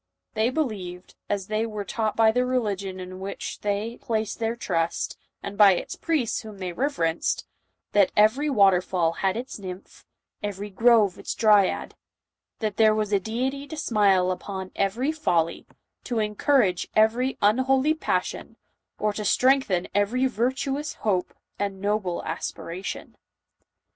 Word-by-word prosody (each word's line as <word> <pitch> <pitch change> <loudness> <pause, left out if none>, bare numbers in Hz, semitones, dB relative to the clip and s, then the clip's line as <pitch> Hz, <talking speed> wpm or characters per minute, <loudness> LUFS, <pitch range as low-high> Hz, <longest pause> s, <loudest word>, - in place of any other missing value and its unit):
They 220 +1 +2
believed, 200 - -4 0.2
as 200 -2 -1
they 215 +2 -1
were 215 -3 -4
taught 220 +2 -1
by 225 -1 +5
the 250 +2 +1
religion 200 -7 -2
in 185 0 -8
which 195 +1 -5
they 210 +3 -2
placed 220 -2 -2
their 225 0 -1
trust, 170 -7 -1 0.3
and 200 - -5
by 200 -2 +7
its - - -5
priests 295 -9 -1
whom 215 -3 -10
they 185 -2 -4
reverenced, 170 - -1 0.5
that 200 -2 +4
every 230 +8 +4
water 195 -8 +5
fall 175 -3 0
had 190 +4 -1
its 245 -2 -6
nymph, 185 -1 -9 0.3
every 205 0 -5
grove 220 -2 +4
its - - -4
dryad, 210 -4 +3 0.3
— - - -62
that 215 -2 -2
there 215 -1 +5
was 215 -1 -1
a 200 - +4
deity 260 +7 -3
to 315 - -7
smile 200 -9 +3
upon 190 +1 -5
every 230 +9 0
folly, 170 - 0 0.4
to 245 - -3
encour 220 +4 +3
age 180 -2 -2
every 235 +5 +3
unholy 260 +7 +3
passion, 315 - -3 0.4
or 210 -1 0
to 210 - -4
strengthen 250 -5 +2
every 210 +6 +2
vir 245 0 +1
tuous 275 +3 -3
hope 190 -4 0 0.3
and 200 -1 -2
noble 200 -3 -1
aspiration. 170 +3 -5
210 Hz, 150 wpm, -25 LUFS, 190-240 Hz, 0.5 s, by